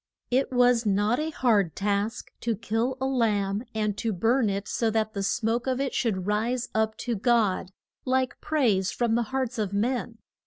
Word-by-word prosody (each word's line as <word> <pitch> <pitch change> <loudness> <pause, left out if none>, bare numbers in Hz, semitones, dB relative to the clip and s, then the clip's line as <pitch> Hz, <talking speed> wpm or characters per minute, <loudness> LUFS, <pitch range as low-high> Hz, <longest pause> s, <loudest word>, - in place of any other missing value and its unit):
It 260 +2 +2
was 245 -2 +4
not 205 +4 +1
a 310 +1 -1
hard 215 - +1
task 205 +3 -1
to 230 -1 0
kill 230 +4 -1
a 265 - -1
lamb, 215 -5 +1
and 210 -2 0
to 225 - -1
burn 225 +4 +2
it 200 +1 -3
so 230 - 0
that 220 0 0
the 200 - -3
smoke 225 +5 0
of 260 0 0
it 275 -1 -1
should 190 -7 -1
rise 230 +4 0
up 220 0 0
to 240 -2 0
God, 215 -4 +1 0.3
like 260 0 0
praise 230 -12 +1
from 235 -2 0
the 235 - +2
hearts 260 -3 -2
of 205 -2 -1
men. 235 +2 -1
225 Hz, 185 wpm, -26 LUFS, 205-250 Hz, 0.3 s, was